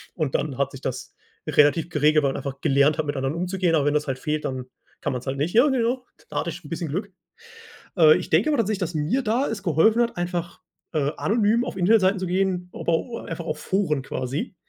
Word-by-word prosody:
und 155 -6 -2
dann 140 -4 -1
hat 140 - 0
sich 135 - -10
das 130 -2 -5 0.3
relativ 150 +3 +3
geregelt, 150 -1 +3
man 135 -1 +1
einfach 135 -1 -5
gelernt 140 +2 +3
hat, 155 - -1
mit 145 - -3
anderen 135 +3 -1
umzugehen, 180 -1 0
aber 145 -3 +2
wenn 145 - +2
das 150 0 0
halt 130 -1 -2
fehlt, 150 +1 -2
dann 130 -1 -3 0.4
kann - - -1
man's 125 +1 -5
halt 135 +1 -2
nicht. 150 +5 -1
Ja 240 +6 +6
genau. 250 -1 0 0.2
Da - - -2
hatte - - -2
ich - - -5
'n 145 - -11
bisschen 165 0 -4
Glück. 195 +7 -3 0.9
Äh, 155 -3 +7
ich - - -5
denke 170 - +3
aber 295 - +1
tatsächlich, 215 -3 0
dass 180 -2 -2
mir 160 - 0
da 245 +4 +1
es 215 -3 -4
geholfen 190 +7 +3
hat, 235 - -2
einfach, 175 -1 -3 0.3
äh, 145 -3 +1
anonym 220 +2 +2
auf 250 - -6
Internetseiten 195 +1 +3
zu 185 - -3
gehen, 180 0 0
aber 170 - -1
o 230 +3 -6
einfach 165 -4 -6
auf 155 - -3
Foren 180 -8 0
quasi 130 +6 -4
165 Hz, 230 wpm, -24 LUFS, 145-200 Hz, 0.9 s, Äh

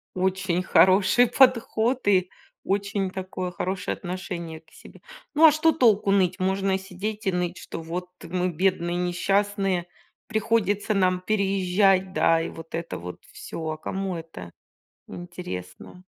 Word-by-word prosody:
Очень 185 -1 0
хороший 190 +6 +5
подход 245 -1 +2
и 185 -3 +3 0.3
очень 200 0 -1
такое 185 -1 -5
хорошее 185 +1 -3
отношение 175 -3 -6
к 160 0 -28
себе. - - -15 0.3
Ну 315 +2 +6
а 315 - +9
что 310 +2 +3
толку 215 -8 +3
ныть? 190 -2 +2
Можно 190 +1 +1
сидеть 195 +3 -6
и - - +3
ныть, 180 0 -2
что 165 - -7
вот 175 +2 -5
мы 180 +1 -1
бедные, 175 0 0
несчастные, 195 +1 0 0.4
приходится 215 -1 0
нам 185 -2 +2
переезжать, 195 -1 +2
да, 165 -3 +3
и 165 - -3
вот 165 0 -9
это 165 0 -4
вот 90 +1 -9
всё. 160 -1 -6
А 155 - -3
кому 190 +3 -4
это 160 - -9 0.6
интересно? 175 - -8
185 Hz, 135 wpm, -25 LUFS, 175-200 Hz, 0.6 s, а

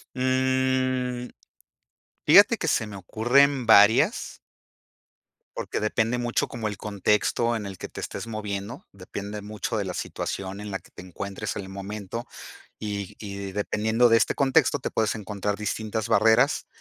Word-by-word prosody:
Mm, 130 -1 0 1.0
fíjate - - +7
que - - -3
se 110 - +1
me 100 - -9
ocurren 125 +7 +2
varias 110 - +5 1.2
porque - - -3
depende 115 +3 0
mucho 120 -1 0
como 115 -3 -4
el 105 -2 -5
contexto 105 +3 +1
en 105 - -4
el 95 -2 -8
que - - -6
te - - -9
estés - - -5
moviendo, 105 +2 -5
depende 100 +2 -7
mucho 105 +2 -4
de 100 - -2
la 90 - -4
situación 95 +1 -4
en 105 - -6
la 95 - -2
que - - -21
te - - -11
encuentres 100 +3 -5
en 100 - -4
el 95 - -10
momento, 100 +3 -6 0.5
y 100 -3 -5
y 100 -2 -6
dependiendo 110 +4 +2
de 115 - +5
este - - +2
contexto, 140 +1 +3
te - - -4
puedes 110 -1 0
encontrar 105 -1 -3
distintas 110 0 -3
barreras, 115 +7 +4
110 Hz, 155 wpm, -25 LUFS, 100-120 Hz, 1.2 s, fíjate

